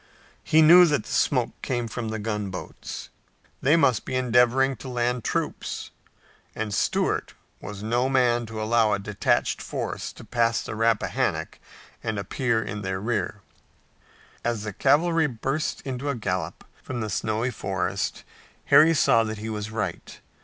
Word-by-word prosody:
He 160 0 +5
knew 175 +3 +9
that 150 -2 +1
the - - -10
smoke 125 -4 +2
came 120 -2 -2
from 115 +1 -4
gunboats. 105 -3 -5 0.5
They 145 +5 +4
must 130 -9 +3
be - - -4
endeavoring 125 +2 +3
to - - -9
land 125 -1 -1
troops, - - -3 0.6
and 110 -1 -3
Stuart - - 0 0.3
was 105 0 -7
no 120 +4 +1
man 120 -3 +2
to 110 0 -6
allow 110 0 +2
a - - +2
detached 100 +1 0
force - - -4
to - - -12
pass 115 -2 +1
the - - -6
Rappahannock 115 0 0 0.4
and 110 -2 -2
appear 110 +3 0
in 105 +1 -5
their 95 -1 -3
rear. 115 +4 -2 1.0
As 120 -3 -1
the 105 -2 -5
cavalry 160 - +3
burst 135 +4 -2
into 135 +1 -4
a 140 - 0
gallop 90 -7 -3 0.2
from 120 -2 -5
the 110 - -2
snowy 110 +5 -1
forest 95 -5 -2 0.5
Harry 165 +2 +8
saw 115 -5 +4
that 110 0 -4
he 110 +2 -5
was 105 -1 -4
right. 110 -1 -4
115 Hz, 150 wpm, -25 LUFS, 105-130 Hz, 1.0 s, knew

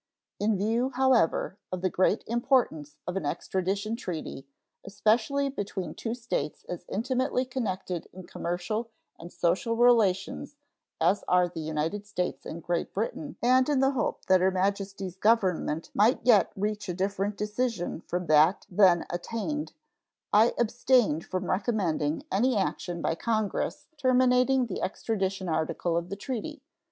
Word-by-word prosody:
In 210 0 +1
view, 225 +6 +1
however, 250 -7 +2
of 185 -1 -3
the 185 - +2
great 190 +3 +2
importance 235 - 0
of 180 - -4
an 195 - -2
extradition 190 +7 -2
treaty, 160 - -6 0.4
especially 220 +8 +1
between 195 - -4
two 225 0 -4
states 230 - -3
as 180 - -6
intimately 255 +3 0
connected 190 -9 -3
in 185 0 -11
commercial 195 +7 -3 0.3
and 170 +1 -10
social 185 +7 0
relations 230 +2 +2 0.4
as 200 - +2
are 180 0 +4
the 175 - -8
United 160 +6 -3
States 180 -3 -3
and 165 +1 -7
Great 175 -1 -2
Britain, 275 +7 -3
and 255 +3 +4
in 290 -3 +2
the 270 +1 +4
hope 265 - -2
that 185 -1 +4
Her 190 - +4
Majesty's 195 -1 -2
Government 190 -7 +1
might 215 +5 +4
yet 220 -6 +5
reach 205 0 -2
a 180 - -2
different 200 +2 -1
decision 210 -5 -2
from 180 0 -2
that 155 +4 +4
then 180 -3 +5
attained, 230 - -3 0.6
I 220 +3 +5
abstained 235 - +2
from 185 0 -3
recommending 180 -8 0
any 235 +5 +2
action 175 -3 -2
by - - +1
Congress 215 +3 -2
terminating 255 -1 +3
the 210 - -5
extradition 195 -2 -2
article 160 +1 -1
of 170 +1 -2
the 200 - -4
treaty. 260 +7 -5
200 Hz, 145 wpm, -28 LUFS, 180-240 Hz, 0.6 s, yet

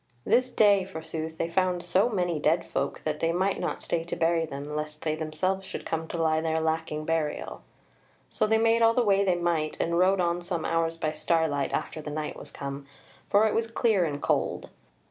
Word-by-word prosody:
This 255 +1 +3
day, 205 -5 +4
forsooth, 160 -3 -6
they 165 - -1
found 180 0 0
so 185 +6 +2
many 175 -7 -1
dead 160 +3 +2
folk, 140 - -3
that 150 -1 -2
they 165 - +1
might 185 +3 0
not - - -3
stay 165 -1 -1
to 170 - -4
bury 165 0 +1
them, 145 +1 -6
lest 150 0 -5
they 155 - 0
themselves 160 +5 -2
should - - -6
come 160 0 -2
to 170 - -5
lie 160 -1 +2
there 160 0 0
lacking 160 -1 -2
burial. 155 - -2 0.7
So - - 0
they 220 +1 +3
made 230 +1 +3
all 230 0 +5
the 245 - +3
way 200 -2 +3
they 185 -2 +2
might, 170 -3 -1
and 170 +1 +1
rode 190 +1 +4
on 175 0 +1
some 170 -2 -3
hours 165 0 0
by 155 -2 -1
starlight 155 -4 0
after 155 - -3
the 150 - -6
night 150 0 -4
was - - -10
come, 140 0 -6 0.4
for 205 +2 +5
it 215 - +1
was 225 0 0
clear 225 -4 +2
and 145 -2 -3
cold. - - -1
165 Hz, 210 wpm, -27 LUFS, 155-190 Hz, 0.7 s, all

